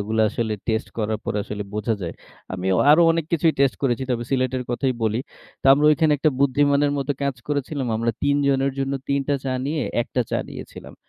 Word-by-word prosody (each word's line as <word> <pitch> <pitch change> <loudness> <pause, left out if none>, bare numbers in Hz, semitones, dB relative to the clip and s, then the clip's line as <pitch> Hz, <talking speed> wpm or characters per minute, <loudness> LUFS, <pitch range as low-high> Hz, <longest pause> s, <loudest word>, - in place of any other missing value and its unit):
এগুলা 110 +2 0
আসলে 110 -2 -2 0.2
টেস্ট 110 +1 0
করার 110 0 -1
পর - - -2
আসলে 105 0 -5
বোঝা 105 +2 -1
যায়। 85 -1 -4 0.4
আমি 95 0 -4 0.2
আরও 165 +3 +7
অনেক 165 -2 -1
কিছুই 165 -1 +3
টেস্ট 135 -2 +3
করেছি। 130 -1 +1
তবে 120 -1 -1
সিলেটের 130 -1 0
কথাই 130 +2 0
বলি। 110 +1 +1 0.4
তো - - -1
আমরা 145 +2 +3
ঐখানে 155 -1 +3
একটা 155 +1 +3
বুদ্ধিমানের 145 +1 +3
মতো 140 +1 -1
কাজ 140 -3 -1
করেছিলাম। 140 -2 -2
আমরা 115 +1 0
৩ 145 0 +2
জনের 135 0 +1
জন্য 135 0 -1 0.2
৩ 140 0 +1
টা 145 - +3
চা 135 - -1 0.2
নিয়ে 150 +1 -1 0.2
১ 120 - -2
টা - - +4
চা - - +1
নিয়েছিলাম। - - -10
135 Hz, 205 wpm, -23 LUFS, 115-145 Hz, 0.4 s, আরও